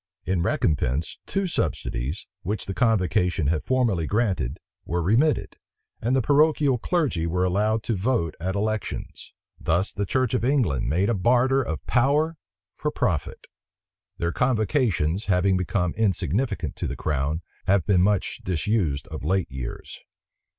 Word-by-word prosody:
In 95 Hz, -2 st, 0 dB
recompense, 75 Hz, -2 st, 0 dB
two 195 Hz, 0 st, -1 dB
subsidies, 75 Hz, -, -2 dB, 0.2 s
which 100 Hz, +2 st, -3 dB
the 95 Hz, -, -4 dB
convocation 90 Hz, -, +1 dB
had 75 Hz, +1 st, +1 dB
formerly 115 Hz, -11 st, +1 dB
granted, 100 Hz, -, 0 dB, 0.3 s
were 85 Hz, +2 st, -2 dB
remitted, 115 Hz, -, +2 dB, 0.4 s
and 120 Hz, +4 st, +1 dB
the 130 Hz, -, +2 dB
parochial 145 Hz, -1 st, +3 dB
clergy 135 Hz, -, 0 dB
were 90 Hz, +2 st, 0 dB
allowed 105 Hz, +4 st, +1 dB
to 115 Hz, -, -1 dB
vote 95 Hz, -5 st, 0 dB
at 95 Hz, +3 st, -2 dB
elections. 110 Hz, +1 st, -3 dB, 0.2 s
Thus 90 Hz, +5 st, 0 dB
the 100 Hz, -1 st, -2 dB
church 130 Hz, +1 st, +1 dB
of 125 Hz, -, +1 dB
England 120 Hz, -, +1 dB
made 90 Hz, +7 st, +2 dB
a -, -, +2 dB
barter 125 Hz, +6 st, +3 dB
of 80 Hz, -11 st, -4 dB
power 150 Hz, +5 st, +2 dB, 0.3 s
for 150 Hz, -, -2 dB
profit. 85 Hz, -, -2 dB, 0.7 s
Their 85 Hz, 0 st, -1 dB
convocations, 110 Hz, -, +1 dB
having 95 Hz, 0 st, +2 dB
become 90 Hz, -1 st, 0 dB
insignificant 105 Hz, -, 0 dB
to -, -, -2 dB
the -, -, -4 dB
crown, 75 Hz, +3 st, -1 dB, 0.2 s
have 95 Hz, -4 st, +3 dB
been 90 Hz, -1 st, +3 dB
much 100 Hz, +1 st, +1 dB
disused 85 Hz, -4 st, 0 dB
of 80 Hz, -2 st, -6 dB
late 95 Hz, +2 st, 0 dB
years. 65 Hz, -2 st, -7 dB
100 Hz, 145 wpm, -25 LUFS, 85-125 Hz, 0.7 s, parochial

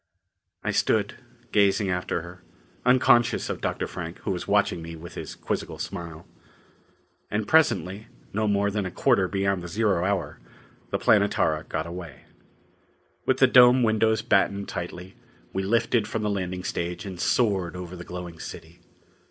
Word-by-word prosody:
I -, -, 0 dB
stood, 105 Hz, -2 st, +1 dB, 0.4 s
gazing 100 Hz, -1 st, +3 dB
after 90 Hz, -2 st, -2 dB
her, 90 Hz, +1 st, -11 dB, 0.5 s
unconscious 120 Hz, -1 st, +4 dB
of -, -, -6 dB
Dr. -, -, -1 dB
Frank, 85 Hz, -1 st, -6 dB
who 100 Hz, -, -2 dB
was 90 Hz, -, -4 dB
watching 100 Hz, -4 st, +2 dB
me 85 Hz, 0 st, -7 dB
with 85 Hz, +2 st, -10 dB
his -, -, -7 dB
quizzical -, -, -4 dB
smile. 85 Hz, -1 st, -6 dB, 1.0 s
And 105 Hz, 0 st, -2 dB
presently, 110 Hz, -10 st, +2 dB, 0.3 s
no 110 Hz, +1 st, 0 dB
more 100 Hz, 0 st, +2 dB
than 100 Hz, -2 st, -1 dB
a -, -, -4 dB
quarter 100 Hz, 0 st, +2 dB
beyond 100 Hz, -1 st, 0 dB
the 90 Hz, -, -6 dB
zero 100 Hz, -1 st, +1 dB
hour, 95 Hz, -2 st, -1 dB, 0.5 s
the -, -, 0 dB
Planetara 80 Hz, 0 st, +2 dB
got 80 Hz, 0 st, -3 dB
away. 85 Hz, -4 st, -8 dB, 1.1 s
With 130 Hz, -, +3 dB
the 130 Hz, -, +6 dB
dome 125 Hz, 0 st, +7 dB
windows 110 Hz, -1 st, +2 dB
battened 100 Hz, -3 st, +2 dB
tightly, 90 Hz, +2 st, -6 dB, 0.4 s
we 95 Hz, -, -1 dB
lifted 110 Hz, +2 st, +1 dB
from 110 Hz, 0 st, -3 dB
the 105 Hz, -, 0 dB
landing 90 Hz, -2 st, -3 dB
stage 85 Hz, 0 st, -3 dB
and 95 Hz, -3 st, -7 dB
soared 95 Hz, -8 st, +1 dB
over 90 Hz, 0 st, -7 dB
the 90 Hz, -, -8 dB
glowing 90 Hz, -2 st, -8 dB
city. 85 Hz, +2 st, -9 dB
95 Hz, 155 wpm, -26 LUFS, 90-105 Hz, 1.1 s, dome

